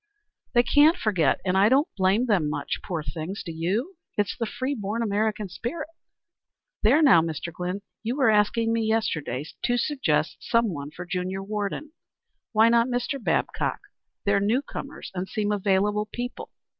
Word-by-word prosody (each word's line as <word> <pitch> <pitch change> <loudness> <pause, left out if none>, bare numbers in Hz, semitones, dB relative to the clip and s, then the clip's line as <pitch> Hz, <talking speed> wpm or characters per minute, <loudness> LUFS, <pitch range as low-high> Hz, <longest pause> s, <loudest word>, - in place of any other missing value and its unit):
"They 240 -1 +5
can't 300 +7 +5
forget, 185 - +2
and 185 0 +1
I 195 +3 +5
don't 275 +6 +4
blame 195 +5 +2
them 190 -10 +2
much, 145 -1 -3
poor 165 -4 -3
things, 170 +5 -5
do 170 - -6
you? 205 - -2 0.2
It's 205 -2 0
the 230 - -2
free 260 +5 -2
born 220 -1 -2
American 215 0 0
spirit. 295 - -5 0.9
There 275 +9 +5
now, 245 - +7
Mr. 165 +1 -4
Glynn, 180 +4 -4 0.2
you 230 +3 -2
were 265 -5 +4
asking 225 +2 +2
me 230 - +1
yesterday 215 - -1 0.2
to 245 - +1
suggest 280 +2 0
some 230 -5 +1
one 145 -1 -6
for 175 +4 -8
junior 185 +1 -3
warden. 210 +8 -3 0.6
Why 220 0 +5
not 235 +1 +4
Mr. 245 +1 -2
Babcock? - - 0 0.5
They're 200 0 +3
new 225 +7 +1
comers 280 0 -7
and 185 0 -4
seem 210 -2 -1
available 205 +1 +1
people." 245 +1 -5
210 Hz, 165 wpm, -26 LUFS, 185-240 Hz, 0.9 s, now